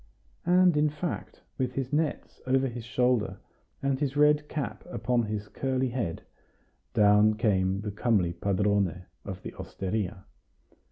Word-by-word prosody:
And 180 -1 +5
in 150 0 +4
fact, 150 +3 -5 0.2
with 125 -1 0
his 135 +1 -3
nets 150 0 -1
over 135 +1 +3
his 120 -2 -6
shoulder, 120 -5 +1 0.5
and 135 -1 +1
his 145 -1 -1
red 150 0 +4
cap 150 -3 -4
upon 125 -8 0
his 105 -2 -3
curly 130 +2 -1
head, 120 -9 -3 0.7
down 105 +1 +5
came 95 -4 +1
the 105 -1 -4
comely 100 -5 +1
padrone 100 -1 0 0.2
of 95 -2 -7
the - - -6
osteria. 95 0 -3
115 Hz, 135 wpm, -28 LUFS, 100-135 Hz, 0.7 s, And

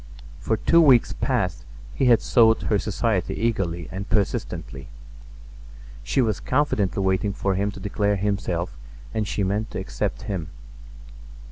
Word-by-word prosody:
For 110 - 0
two 170 +8 +4
weeks 130 -7 +5
past - - -1 0.3
he 135 - 0
had 120 -2 +5
sought 115 -2 +4
her 105 - +1
society 105 -1 -1
eagerly 95 -7 -1
and 95 +2 -6
persistently. 95 -9 -2 1.1
She 130 - +1
was 110 -4 0
confidently 110 -9 0
waiting 95 +2 +1
for 100 -1 -1
him 100 +2 0
to 100 - -8
declare 100 0 0
himself 95 -3 -2 0.4
and 110 -2 -1
she 100 - -1
meant 105 +4 -1
to - - -5
accept 100 +2 -3
him. 95 -7 -4
100 Hz, 140 wpm, -24 LUFS, 95-110 Hz, 1.1 s, weeks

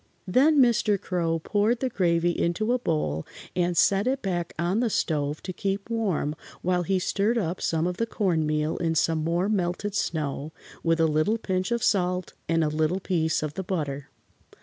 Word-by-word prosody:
Then 270 - +4
Mr. 235 -5 +3
Crow 170 -3 -1
poured 210 +8 +1
the 260 - 0
gravy 175 -6 +1
into 175 +8 0
a 250 - +1
bowl 150 - -1 0.3
and 175 -1 +1
set 200 +6 +4
it 270 +1 0
back 175 -3 -2
on 175 +6 0
the 240 -1 +1
stove 150 -6 -1
to 185 - -5
keep 195 +4 -3
warm 190 -10 0 0.3
while 180 0 +2
he 190 +2 +1
stirred 200 +5 +1
up 180 -4 -2
some 165 0 0
of 180 0 -2
the 230 - 0
cornmeal 155 -7 0
in 165 -1 0
some 160 0 +1
more 170 +4 +1
melted 200 0 -1
snow, 155 -5 -2 0.3
with 165 0 +1
a 165 - +5
little 155 +8 +2
pinch 185 -4 -2
of 235 -1 0
salt 180 -2 +1 0.2
and 165 -1 +3
a - - +2
little 155 +4 0
piece 160 -5 0
of 150 -1 -3
the 190 - -4
butter. 145 -7 -3
180 Hz, 185 wpm, -26 LUFS, 160-205 Hz, 0.3 s, a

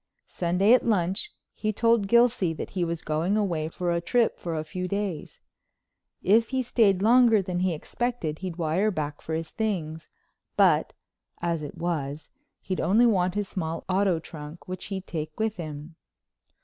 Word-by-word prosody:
Sunday 180 +5 +3
at 250 - +5
lunch 195 -3 0 0.2
he 215 - -1
told 230 -1 +2
Gilsey 235 -6 +3
that - - -6
he 180 - -1
was 170 -1 -3
going 165 +7 0
away 170 -7 0
for 175 +1 -2
a 170 0 0
trip 235 +6 +1
for 170 -2 -4
a 155 - -2
few 180 +4 -4
days. 200 -4 -4 0.8
If 225 +4 +4
he 260 -1 0
stayed 200 -6 +3
longer 235 -1 +6
than 180 -1 -2
he 180 -2 +1
expected 175 -3 -3
he'd 185 -3 -5
wire 170 +5 +1
back 150 -6 -4
for 160 - -3
his 160 -1 -4
things, 165 -8 -3 0.5
but, - - +4 0.5
as 170 -2 -1
it 145 - -7
was, 150 -4 -3 0.3
he'd 185 - -3
only 220 +6 +4
want 185 -5 +2
his 205 -1 -1
small 165 -4 -4
auto 190 -1 +2
trunk, 155 0 -9
which 185 0 -6
he'd 195 -2 -5
take 155 0 -5
with 220 -2 0
him. 155 -1 -7
180 Hz, 170 wpm, -26 LUFS, 160-210 Hz, 0.8 s, longer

